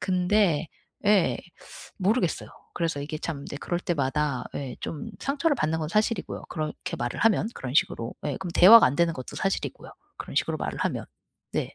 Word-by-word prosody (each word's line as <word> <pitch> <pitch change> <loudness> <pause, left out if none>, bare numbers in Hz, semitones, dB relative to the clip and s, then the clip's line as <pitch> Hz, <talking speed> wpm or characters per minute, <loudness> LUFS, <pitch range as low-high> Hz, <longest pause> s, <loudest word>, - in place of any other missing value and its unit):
근데 180 -3 +2 0.4
예 205 -4 +4 0.6
모르겠어요. 195 -1 +1 0.3
그래서 165 -4 -1
이게 155 +2 -5
참 155 -2 -4
인제 140 - -7
그럴 175 +3 -2
때마다 145 -4 -1
예 135 -3 -4
좀 225 +9 -5
상처를 290 +2 +1
받는 160 -5 0
건 155 - -2
사실이고요. 215 +3 0
그렇게 160 +2 -4
말을 120 -4 -3
하면 220 -1 +3
그런 130 -1 -6
식으로. 115 -6 +1
예. - - -2
그럼 190 -2 -5
대화가 225 +6 +9
안 130 - 0
되는 170 +1 +3
것도 130 -3 -8
사실이고요. 195 - -2 0.3
그런 - - -7
식으로 - - +1
말을 - - -4
하면. - - -1 0.5
네. - - -2
170 Hz, 370 characters per minute, -26 LUFS, 150-200 Hz, 0.6 s, 대화가